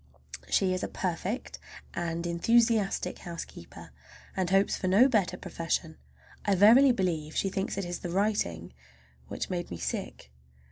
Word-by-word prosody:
She 190 -2 +2
is 185 - -2
a - - -2
perfect, 185 +6 -4 0.3
and 170 0 -3
enthusiastic 220 +4 +2
housekeeper, 170 - -9 0.4
and 185 -2 0
hopes 195 +1 +3
for 185 - -3
no 205 +8 +6
better 215 -8 +1
profession. 165 -3 -3 0.4
I 200 -1 +2
verily 235 +8 +7
believe 165 -8 -2
she 195 - +1
thinks 195 0 -3
it 195 - -2
is 175 0 -4
the 175 - -5
writing 170 - -1 0.5
which - - -5
made 175 -1 -3
me 85 - -6
sick! 65 -5 -5
185 Hz, 145 wpm, -29 LUFS, 170-205 Hz, 0.5 s, verily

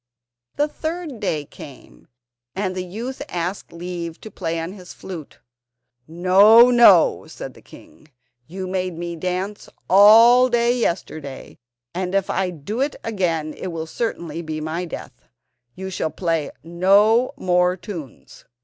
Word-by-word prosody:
The 295 - +1
third 315 -4 -5
day 155 -8 -2
came, 140 -1 -14 0.5
and 190 -1 -2
the 185 - -3
youth 230 +9 -6
asked 180 +3 -4
leave 170 -1 -6
to 220 - -10
play 165 -2 -3
on 165 +3 -5
his 185 -3 -12
flute. 170 -6 -9 0.7
"No, 195 +8 +6
no," 240 -1 +5
said - - -9
the - - -17
king, 155 - -17 0.4
"you 185 +3 -6
made 185 -2 -3
me 170 0 -5
dance 185 +4 -4 0.2
all 230 +6 +7
day 240 0 +2
yesterday, 155 - -4 0.3
and 185 +1 -3
if 195 -1 0
I 190 -1 0
do 180 - -5
it 285 +2 -1
again 165 -8 -2
it - - -6
will 165 -2 -4
certainly 170 -3 -4
be 155 -1 -5
my 160 +3 -3
death. 165 - -10 0.5
You 190 +1 -6
shall 160 - -2
play 165 -1 -2
no 200 +8 +3
more 180 0 +1
tunes. 170 - -10
185 Hz, 140 wpm, -21 LUFS, 165-215 Hz, 0.7 s, all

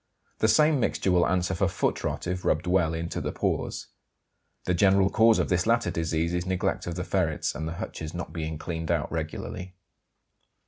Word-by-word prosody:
The 110 - +3
same 150 +5 +4
mixture 100 -5 0
will 90 -1 +4
answer 90 0 0
for 85 - +1
"foot - - -1
rot" - - -2
if 90 0 -3
rubbed 80 - +1
well 90 -3 +2
into 85 +1 -3
the - - -2
paws. - - -2 0.8
The 90 - +1
general 95 +1 +4
cause 115 -1 +5
of - - 0
this 90 +1 +1
latter 115 +1 +2
disease 80 +1 -1
is 90 +1 -2
neglect 95 -1 -1
of 85 - -3
the 90 - -3
ferrets 90 -5 0
and 80 +2 -4
the 80 - -4
hutches 80 -2 -6
not 85 -2 -6
being 80 -2 -3
cleaned 80 +1 -5
out - - 0
regularly. 90 0 -5
90 Hz, 190 wpm, -27 LUFS, 80-95 Hz, 0.8 s, cause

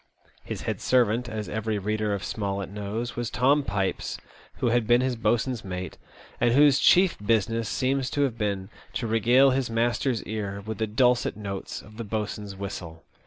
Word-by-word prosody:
His - - -6
head - - -3
servant, 120 -1 +2
as 110 -1 -4
every 110 0 -2
reader 105 +1 -1
of 100 -1 -2
Smollett 100 -2 -3
knows, 105 +4 -4
was 120 -1 -2
Tom 135 +5 +3
Pipes, 100 -6 -2 0.4
who 120 - 0
had 120 -2 +2
been 120 +1 +5
his 130 -1 0
boatswain's 120 +1 0
mate, 90 -1 -6 0.4
and 120 0 +3
whose 145 -1 +6
chief 185 -1 +5
business 115 +1 +1
seems 135 0 0
to 145 - +1
have 130 -5 0
been 100 -3 -2 0.2
to 120 - -2
regale 120 +5 +4
his 130 -2 0
master's 120 +1 0
ear 100 -2 -4
^th 110 0 -4
the 110 - 0
dulcet 125 +2 +2
notes 100 -2 -5
of 110 +1 -15
the 115 - -4
boatswain's 105 -2 -4
whistle. 85 -4 -7
110 Hz, 175 wpm, -26 LUFS, 100-125 Hz, 0.4 s, whose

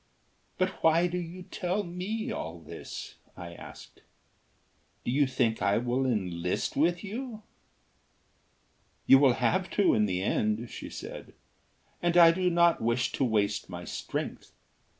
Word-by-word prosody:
"But 185 0 -1
why 165 +2 +4
do 180 0 -1
you 175 +1 -7
tell 185 +3 -2
me 190 +5 -4
all 85 +1 -5
this?" - - -8 0.2
I 85 -1 -8
asked. - - -12 1.0
"Do - - 0
you 140 +2 +3
think 125 -4 0
I 100 +2 +3
will 125 +3 0
enlist 90 -7 -1
with 170 +4 +2
you?" 220 +1 -6 1.6
"You 135 - +8
will 135 -3 +5
have 185 +8 +1
to 200 -3 +5
in 105 -1 +3
the 95 -1 -1
end," 110 +3 0
she - - -7
said, - - -8 0.7
"and 175 0 +2
I 170 -1 +9
do 180 +1 +1
not 170 -1 +3
wish 115 +2 +1
to - - -1
waste 105 -5 0
my 90 -1 -7
strength. - - -5
140 Hz, 145 wpm, -29 LUFS, 110-180 Hz, 1.6 s, I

